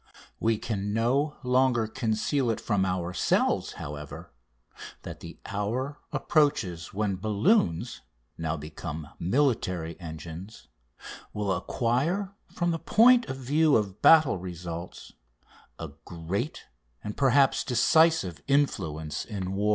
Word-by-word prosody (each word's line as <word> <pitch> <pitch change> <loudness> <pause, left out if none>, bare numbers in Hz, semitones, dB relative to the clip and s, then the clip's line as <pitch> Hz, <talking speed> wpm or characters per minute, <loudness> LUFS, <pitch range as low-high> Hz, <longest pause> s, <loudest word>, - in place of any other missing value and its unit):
We 115 -1 +2
can 105 -2 -3
no 135 +7 +1
longer 125 -2 +3
conceal 115 +3 -1
it 115 - -1
from 100 -3 0
ourselves, 90 -1 0
however, 75 0 -8 0.7
that - - -8
the - - -10
hour 125 +8 -3
approaches 140 - +1
when 100 -1 -1
balloons, 105 - +1 0.3
now 80 -1 -2
become 75 0 -7
military 90 - 0
engines, 85 +4 -9 0.7
will 105 -2 -1
acquire, 130 - -1 0.2
from 175 -1 0
the 165 - -2
point 240 +5 +5
of 130 - -4
view 145 +4 +3
of 100 -2 -1
battle 155 - +6
results, 85 -1 -7 0.6
a - - -6
great 90 - -4 0.4
and, 105 - -5
perhaps, 135 0 +3
decisive 130 - +3
influence 80 - 0
in 95 -4 -5
war." 105 +2 0
105 Hz, 110 wpm, -27 LUFS, 90-140 Hz, 0.7 s, battle